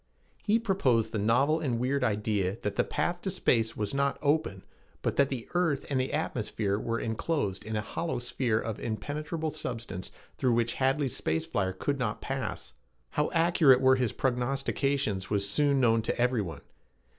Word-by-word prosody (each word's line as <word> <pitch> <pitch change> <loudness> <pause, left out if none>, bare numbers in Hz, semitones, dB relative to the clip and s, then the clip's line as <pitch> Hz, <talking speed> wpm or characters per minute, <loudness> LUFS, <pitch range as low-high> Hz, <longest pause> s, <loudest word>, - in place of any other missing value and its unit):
He 215 +1 +3
proposed 185 - +1
the 110 - -1
novel 135 +9 +3
and 130 -7 -1
weird 130 +3 0
idea 105 -3 0
that 105 -1 -2
the - - +3
path 175 0 -1
to 195 - -2
space 115 -10 +1
was 105 +2 -2
not 140 0 +1
open, 155 +2 +1 0.4
but - - 0
that 140 -1 +4
the 125 -4 -4
earth 165 -6 +1
and 130 -2 +2
the 130 - -2
atmosphere 110 -8 -1
were 115 +1 -2
enclosed 110 - -2
in 110 +1 -4
a 105 - 0
hollow 160 +6 -3
sphere 120 -2 0
of 110 -2 -4
impenetrable 150 - -3
substance 115 - -5 0.3
through 125 -2 +3
which 115 0 +1
Hadley's 135 0 +1
space 80 +1 -1
flyer 95 -2 -1
could 140 +9 -2
not 110 -4 -1
pass. - - -4 0.4
How 150 - +1
accurate 165 -6 +5
were 130 0 +5
his 125 -4 +1
prognostications 130 -4 0
was 100 -1 +1
soon 140 +5 +2
known 115 -3 +4
to 110 - -2
everyone. 120 -8 0
125 Hz, 170 wpm, -29 LUFS, 110-145 Hz, 0.4 s, accurate